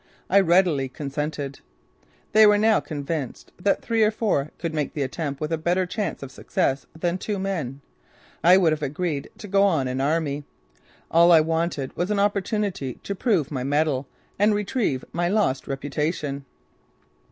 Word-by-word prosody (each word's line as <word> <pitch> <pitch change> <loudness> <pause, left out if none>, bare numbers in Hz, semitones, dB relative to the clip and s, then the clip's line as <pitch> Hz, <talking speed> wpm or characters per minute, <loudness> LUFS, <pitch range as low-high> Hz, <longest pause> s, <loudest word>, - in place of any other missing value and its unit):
I 200 - +7
readily 170 -7 +3
consented. 145 0 -4 0.7
They 215 0 +7
were 210 0 +5
now 220 +1 +4
convinced 145 -3 -5
that 200 +2 +1
three 225 -1 +1
or 215 - +5
four 210 -10 0
could 165 -2 -4
make 150 -3 -2
the 145 - 0
attempt 140 +1 -4
with 155 +1 -3
a 165 - 0
better 175 +3 +1
chance 200 -3 -3
of 135 - -8
success 135 0 -1
than 175 +2 -1
two 210 +1 -3
men. 165 -9 -3 0.6
I 180 +2 +7
would 175 -4 +4
have 155 - -4
agreed 150 +1 -2
to 210 - -9
go 200 +1 +4
an 135 -6 0
army! 145 0 0 0.7
All 170 +1 +6
I 165 -2 +8
wanted 160 -3 -2
was 175 +2 -1
an 210 -1 +1
opportunity 200 - -1
to 200 - -3
prove 190 - 0
my 130 -3 -2
mettle 145 -1 0 0.3
and 210 +1 +4
retrieve 210 - -1
my 175 0 0
lost 200 -10 +1
reputation. 145 0 -3
165 Hz, 165 wpm, -24 LUFS, 140-195 Hz, 0.7 s, I